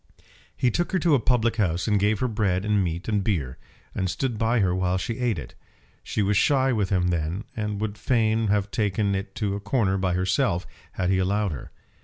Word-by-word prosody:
He 125 - +2
took 175 - -1
her - - +3
to 170 -3 +2
a 140 - +5
public 120 -1 +1
house 90 -4 0
and 105 -2 +3
gave 105 +1 +1
her 130 - +2
bread 100 -4 0
and 105 -2 +2
meat 85 +1 -3
and 105 -3 +1
beer, 80 - -2 0.3
and 95 - -1
stood 115 +5 -2
by 115 +1 +2
her 95 -3 +2
while 90 0 0
she 110 +6 -4
ate 120 -5 0
it. 65 -5 -8 0.5
She 105 - -1
was 100 +1 +1
shy 135 +1 +3
with 105 -4 0
him 90 -2 +1
then, 85 +4 -2
and 105 -2 -3
would 105 -1 -3
fain 110 -1 +1
have 100 0 +1
taken 100 -1 0
it 95 0 -4
to 105 -3 -1
a 100 - -3
corner 100 -2 0
by 95 -1 0
herself, 90 -1 +1 0.3
had 90 0 0
he 95 - +2
allowed 100 +1 +1
her. 70 - -7
100 Hz, 220 wpm, -25 LUFS, 95-110 Hz, 0.5 s, a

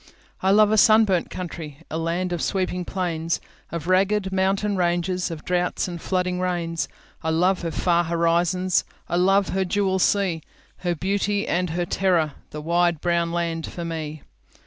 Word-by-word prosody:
I 190 - +2
love 210 +1 +5
a 220 - +4
sunburnt 215 -5 +4
country,A 165 -3 -7
land 175 +2 -1
of 175 - -2
sweeping 180 -2 -1
plains, 170 -3 -2 0.3
Of 170 -2 -4
ragged 190 +2 +2
mountain 195 +2 +1
ranges, 180 +1 0
Of 160 -2 -7
droughts 180 +1 0
and 175 -2 -6
flooding 180 -1 -1
rains.I 170 -2 -3
love 180 +4 +2
her 170 - -2
far 175 +1 +1
horizons,I 170 +1 0
love 195 +2 +3
her 190 0 0
jewel 190 0 0
sea, 185 -4 +2 0.4
Her 175 -1 -1
beauty 200 +4 0
and 180 0 0
her 175 +2 -1
terror—The 165 -5 -1
wide 170 +1 +2
brown 170 0 +1
land 170 -1 -2
for 170 - -6
me! 155 -2 -5
175 Hz, 145 wpm, -24 LUFS, 170-190 Hz, 0.4 s, love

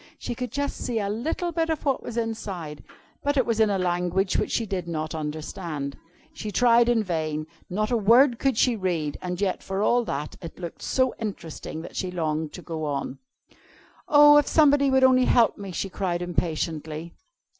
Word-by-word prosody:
She - - -4
could 250 +1 -5
just 285 0 -2
see 240 - -3
a 200 -2 -1
little 310 - -2
bit 325 0 0
of 320 -1 -2
what 275 -2 +1
was 235 - -7
inside, 200 -9 -4 0.4
but 285 0 0
it 260 - +3
was 230 -2 0
in 220 -1 +4
a 200 - +1
language 180 +1 0
which - - +1
she 230 - 0
did 190 -4 -4
not 155 -2 -3
understand. 155 -1 -5 0.4
She 215 - -6
tried 235 +2 +4
in 230 -2 +3
vain; 155 -4 -2 0.2
not 215 +5 -1
a 240 - +3
word 235 +4 +5
could 270 -4 +1
she 245 0 +3
read; 170 -7 -2
and 180 0 -4
yet, 195 -2 0
for 195 +1 -2
all 240 +2 +3
that, 145 -2 -4
it 165 - -9
looked 170 -2 -7
so 260 -1 +1
interesting 165 -6 -6
that - - -10
she 185 - -2
longed 160 -3 -2
to 180 - -9
go 160 -2 -4
on. 140 -2 -3 0.9
"Oh, 295 0 +8
if 295 - +4
somebody 285 -3 +4
would 265 0 +3
only 255 -1 +5
help 235 -3 +3
me!" 200 -2 -6
she 180 - -3
cried 180 -2 -2
impatiently. 160 -1 -3
195 Hz, 195 wpm, -25 LUFS, 165-240 Hz, 0.9 s, Oh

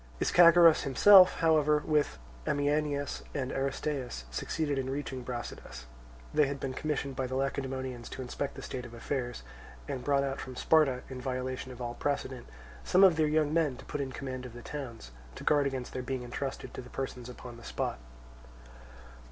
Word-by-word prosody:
Ischagoras 170 -1 +7
himself, 185 +7 +7
however, 155 -2 +4
with 150 - +1 0.3
Ameinias 145 0 0
and 130 -3 -2
Aristeus, 135 - -3
succeeded 145 - -1
in 130 0 -3
reaching 135 -1 -4
Brasidas; 120 - -7 0.5
they 150 -2 +4
had 140 0 -4
been 135 -1 -3
commissioned 140 -2 -2
by 130 0 -1
the 130 - -4
Lacedaemonians 130 -2 -3
to 130 - -6
inspect 135 +3 -4
the - - -8
state 125 -1 -5
of 120 -1 -10
affairs, 120 - -3 0.4
and 125 - -4
brought 140 -1 +2
out 135 0 -3
from 130 - -8
Sparta 140 -3 +3
(in 130 -1 -7
violation 130 0 -3
of 125 0 -7
all 120 0 -3
precedent) 130 -2 -3 0.4
some 185 - +4
of 185 -4 +7
their 155 -1 +2
young 155 0 +2
men 155 -6 +1
to - - -12
put 145 - -3
in 135 -1 -3
command 130 -1 -5
of 120 - -13
the 120 0 -10
towns, 120 - -7 0.2
to - - -8
guard 145 -2 +3
against 130 -2 -4
their 130 - -3
being 130 0 -3
entrusted 130 +3 -5
to - - -6
the 125 - -12
persons 125 -2 -5
upon 125 -1 -10
the 120 - -13
spot. - - -3
135 Hz, 180 wpm, -30 LUFS, 125-145 Hz, 0.5 s, Ischagoras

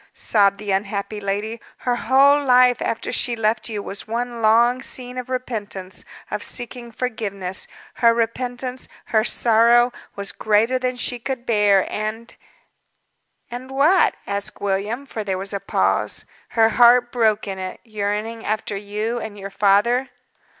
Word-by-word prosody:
sobbed 200 -2 +2
the 205 -1 -4
unhappy 200 +2 -2
lady, 205 +3 -3 0.2
"her 245 -1 0
whole 275 +4 +4
life, 250 -2 +5
after 230 - -2
she 240 -2 0
left 225 +1 0
you, 210 -2 -4
was 200 +1 -7
one 235 +1 -3
long 235 +3 +4
scene 250 -1 -5
of 250 0 -6
repentance, 210 -7 -4 0.3
of 210 -1 -3
seeking 240 0 -3
forgiveness. 205 -6 -4 0.3
Her 235 -1 +4
repentance, 245 +2 -2 0.2
her 220 -1 +2
sorrow, 235 +1 +4 0.2
was 200 -2 -4
greater 220 +6 +2
than 255 0 -1
she 245 0 -2
could 255 0 -4
bear, 205 -4 +3
and 215 +2 -5 0.5
" - - -46
"And 250 +2 -7
what?" 300 +7 +3
asked 200 0 -3
William, 205 +7 -2
for 225 -5 -5
there 190 -2 -2
was 195 +2 -6
a 200 - -1
pause. 100 - 0 0.2
"Her 225 -1 +4
heart 240 +1 +5
broke 220 -3 +1
in 190 -1 -4
it 185 0 -6
yearning 215 +1 -3
after 215 -1 -2
you 210 +4 -3
and 220 -2 -7
your 195 0 -7
father." 210 +7 +3
225 Hz, 150 wpm, -21 LUFS, 205-245 Hz, 0.5 s, life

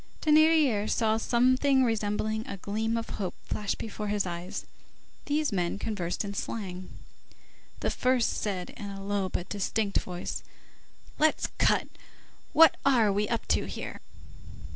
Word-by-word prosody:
Thénardier 305 -8 +4
saw 220 -1 +2
something 255 +4 +3
resembling 215 -1 -1
a 200 - -5
gleam 220 +4 -1
of 230 - -3
hope 185 - -3
flash 210 -1 -2
before 215 -1 -5
his 205 -1 0
eyes,—these 185 - -5
men 180 -2 0
conversed 200 -3 -2
in 200 - -4
slang. 185 -3 -5 0.9
The - - 0
first 250 -2 +2
said 190 -4 -3
in 205 - -7
a 195 0 -7
low 200 -1 -1
but 180 - -3
distinct 205 +1 0
voice:— 180 -1 -5 0.8
"Let's 310 0 +2
cut. - - +3 0.6
What 320 0 +7
are 235 -7 +4
we 205 +1 0
up 230 - -1
to - - +2
here?" - - -6
215 Hz, 135 wpm, -28 LUFS, 200-245 Hz, 0.9 s, What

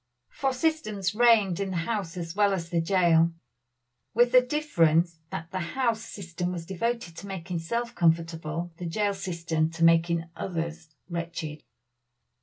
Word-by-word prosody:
For 270 -1 0
system 260 -6 -1
reigned 215 -6 +4
in 200 -1 -1
the 185 - -2
house 185 -1 -2
as 165 0 -5
well 205 -1 +4
as 170 -3 -3
the 170 -1 +2
jail, 170 -2 +4 0.8
with 240 +1 +5
this 250 0 +6
difference, 170 - +2
that 165 +2 -6
the 185 - -2
house 230 +5 0
system 180 -4 -5
was 170 -2 -5
devoted 195 0 -2
to 200 - -8
making 180 -2 -4
self 235 +8 -2
comfortable 165 -1 0
the 175 - -4
jail 205 +4 0
system 170 -4 -1
to 165 0 -3
making 165 0 +4
others 165 -2 -4 0.2
wretched. 170 -3 -5
175 Hz, 150 wpm, -27 LUFS, 165-210 Hz, 0.8 s, this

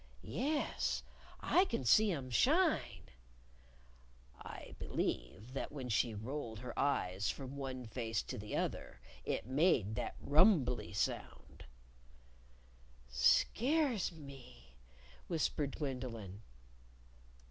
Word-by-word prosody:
"Yes. 295 +3 -1 0.4
I 370 - +4
can 230 - -2
see 215 - +6
'em 135 -6 -4
shine!" 285 - +3 1.4
"I - - -9
believe 105 - -3
that 135 - -3
when 135 -4 -5
she 110 +1 +2
rolled 115 +1 -4
her 125 -2 -6
eyes 100 -8 +1
from 135 0 -5
one 130 -2 -4
face 115 -1 -2
to - - -6
the 105 +1 -5
other - - -3 0.3
it - - -1
made 130 - +3
that - - -3
rumbley 145 - +4
sound." 100 - -3 1.5
"Scares 245 - +3
me," 135 - -12 0.5
whispered 150 -4 0
Gwendolyn. 120 - -5
130 Hz, 100 wpm, -36 LUFS, 110-160 Hz, 1.5 s, see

